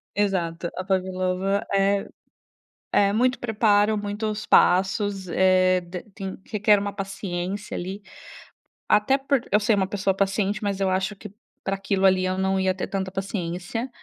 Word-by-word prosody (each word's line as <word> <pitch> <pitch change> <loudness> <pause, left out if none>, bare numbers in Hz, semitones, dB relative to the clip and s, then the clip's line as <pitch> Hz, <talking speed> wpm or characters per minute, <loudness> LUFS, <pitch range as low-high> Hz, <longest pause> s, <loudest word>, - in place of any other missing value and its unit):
Exato, 175 -4 -1
a 185 - -4
pavlova 185 +1 -1
é 195 0 +2 0.9
é 200 0 +4
muito 250 +3 +2
preparo, 215 -2 +2
muitos 210 +1 -3
passos, 195 +1 +3
eh, 185 0 +4
d 175 +1 -8
tem 195 -1 -6
requer 210 0 +4
uma 200 0 -2
paciência, 195 0 -5
ali. 190 +3 -5 0.9
Até 210 +6 +4
por 275 -1 0
eu 210 - +5
ser 215 +1 +2
uma 190 - +1
pessoa 195 -1 0
paciente, 200 +2 0
mas 200 -1 -2
eu 190 -1 +2
acho 190 +2 -1
que 195 - -11 0.3
pra 195 0 -1
aquilo 195 0 -1
ali 185 -1 +4
eu 185 0 0
não 190 0 +1
ia 190 -1 +1
ter 190 - -4
tanta 190 -1 -3
paciência. 195 +4 -4
195 Hz, 155 wpm, -24 LUFS, 185-205 Hz, 0.9 s, eu